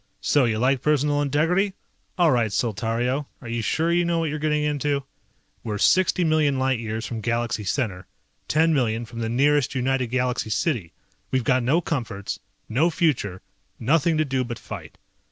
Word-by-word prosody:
So 145 Hz, -3 st, +3 dB
you 110 Hz, -2 st, 0 dB
like 130 Hz, +3 st, +2 dB
personal 145 Hz, -1 st, +2 dB
integrity? 165 Hz, +8 st, +1 dB, 0.4 s
All 170 Hz, -3 st, +4 dB
right, 120 Hz, -3 st, +2 dB
Saltario, 120 Hz, +6 st, -1 dB
are 120 Hz, -, -10 dB
you 115 Hz, 0 st, -2 dB
sure 160 Hz, +9 st, 0 dB
you 175 Hz, +1 st, +3 dB
know 170 Hz, 0 st, 0 dB
what 165 Hz, -2 st, 0 dB
you're 155 Hz, -, -3 dB
getting 150 Hz, 0 st, +1 dB
into? 145 Hz, -1 st, 0 dB, 0.6 s
We're 105 Hz, -2 st, -3 dB
60 185 Hz, -, +3 dB
million 155 Hz, -4 st, +2 dB
light 130 Hz, -2 st, +1 dB
years 110 Hz, 0 st, -4 dB
from 115 Hz, -2 st, -5 dB
Galaxy 120 Hz, 0 st, -1 dB
Center, 95 Hz, -4 st, -2 dB, 0.4 s
10 160 Hz, +2 st, +3 dB
million 120 Hz, -4 st, 0 dB
from 115 Hz, 0 st, -9 dB
the 115 Hz, -1 st, -2 dB
nearest 140 Hz, +3 st, +2 dB
United 130 Hz, 0 st, 0 dB
Galaxy 125 Hz, -1 st, -1 dB
city. 110 Hz, -, -1 dB, 0.4 s
We've 130 Hz, -2 st, 0 dB
got 130 Hz, +2 st, +2 dB
no 140 Hz, +8 st, +2 dB
comforts, 115 Hz, -, -3 dB, 0.3 s
no 145 Hz, +10 st, +2 dB
future, 140 Hz, -, 0 dB, 0.4 s
nothing 155 Hz, +6 st, +2 dB
to 155 Hz, -, +2 dB
do 135 Hz, -2 st, 0 dB
but 120 Hz, -1 st, -5 dB
fight. -, -, -9 dB
130 Hz, 170 wpm, -24 LUFS, 115-150 Hz, 0.6 s, All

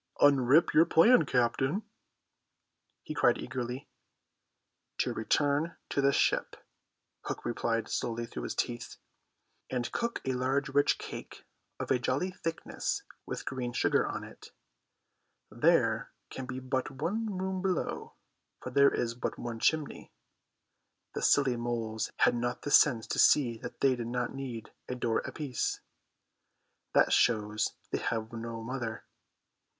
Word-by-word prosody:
"Unrip 140 Hz, +2 st, +5 dB
your 165 Hz, -, +7 dB
plan, 235 Hz, +12 st, +5 dB
captain," 135 Hz, -, +1 dB, 1.2 s
he -, -, -5 dB
cried 135 Hz, -5 st, +3 dB
eagerly. 125 Hz, +1 st, -5 dB, 1.1 s
"To -, -, 0 dB
return 145 Hz, +7 st, +1 dB
to 140 Hz, -, 0 dB
the 140 Hz, 0 st, +4 dB
ship," -, -, +1 dB, 0.7 s
Hook -, -, -5 dB
replied 115 Hz, -1 st, -1 dB
slowly 120 Hz, 0 st, -2 dB
through 90 Hz, -, -7 dB
his -, -, -4 dB
teeth, 120 Hz, -1 st, -3 dB, 0.7 s
"and 120 Hz, -2 st, -2 dB
cook 235 Hz, 0 st, -2 dB
a 130 Hz, -, 0 dB
large 135 Hz, +3 st, 0 dB
rich 145 Hz, +1 st, +3 dB
cake -, -, -9 dB, 0.3 s
of -, -, -3 dB
a 130 Hz, -, +3 dB
jolly 135 Hz, +9 st, 0 dB
thickness 165 Hz, -3 st, -3 dB, 0.2 s
with -, -, -5 dB
green 125 Hz, -2 st, -3 dB
sugar 120 Hz, -, +2 dB
on -, -, -4 dB
it. -, -, -12 dB, 1.0 s
There 120 Hz, -3 st, +2 dB, 0.2 s
can 130 Hz, -1 st, -6 dB
be 130 Hz, 0 st, -4 dB
but 130 Hz, 0 st, -2 dB
one 200 Hz, +9 st, -2 dB
room 190 Hz, 0 st, -2 dB
below, 185 Hz, -2 st, -2 dB, 0.4 s
for -, -, -7 dB
there 140 Hz, 0 st, +5 dB
is 115 Hz, -1 st, -1 dB
but 120 Hz, -, -4 dB
one 115 Hz, -1 st, -5 dB
chimney. 155 Hz, +4 st, 0 dB, 1.0 s
The -, -, -3 dB
silly 135 Hz, -4 st, +3 dB
moles 115 Hz, -2 st, -2 dB
had -, -, +4 dB
not 120 Hz, +1 st, -2 dB
the 145 Hz, -, -3 dB
sense 120 Hz, -8 st, +5 dB
to -, -, -2 dB
see 120 Hz, -6 st, +5 dB
that -, -, -9 dB
they 135 Hz, -2 st, +4 dB
did 120 Hz, -2 st, -5 dB
not 125 Hz, 0 st, -2 dB
need 125 Hz, -5 st, -6 dB, 0.2 s
a 125 Hz, -, -2 dB
door 120 Hz, -2 st, 0 dB
apiece. 140 Hz, -5 st, -3 dB, 1.1 s
That -, -, +4 dB
shows 105 Hz, -2 st, +2 dB, 0.2 s
they -, -, 0 dB
have 110 Hz, 0 st, -3 dB
no 115 Hz, 0 st, -5 dB
mother. 120 Hz, -2 st, -4 dB
125 Hz, 140 wpm, -30 LUFS, 120-145 Hz, 1.2 s, your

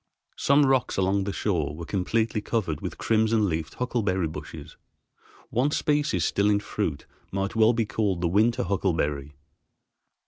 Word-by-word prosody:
Some 140 Hz, +1 st, +4 dB
rocks 130 Hz, -3 st, +1 dB
along 95 Hz, +1 st, +1 dB
the 100 Hz, -, -2 dB
shore 80 Hz, -9 st, -1 dB
were 85 Hz, +1 st, -7 dB
completely 105 Hz, +5 st, 0 dB
covered 95 Hz, -9 st, -2 dB
with -, -, -5 dB
crimson 110 Hz, -1 st, +2 dB
leafed 80 Hz, -2 st, -3 dB
huckleberry 105 Hz, -8 st, 0 dB
bushes; 80 Hz, -, -9 dB, 0.8 s
one 130 Hz, +5 st, +2 dB
species 145 Hz, -, +1 dB
still 100 Hz, +1 st, +2 dB
in 100 Hz, -1 st, +3 dB
fruit 100 Hz, -7 st, -3 dB, 0.3 s
might 95 Hz, +2 st, -2 dB
well 110 Hz, +1 st, +5 dB
be 115 Hz, -1 st, 0 dB
called 100 Hz, -5 st, -1 dB
the 85 Hz, -, +2 dB
winter 110 Hz, +7 st, +2 dB
huckleberry. 75 Hz, -7 st, -1 dB
100 Hz, 145 wpm, -26 LUFS, 85-115 Hz, 0.8 s, well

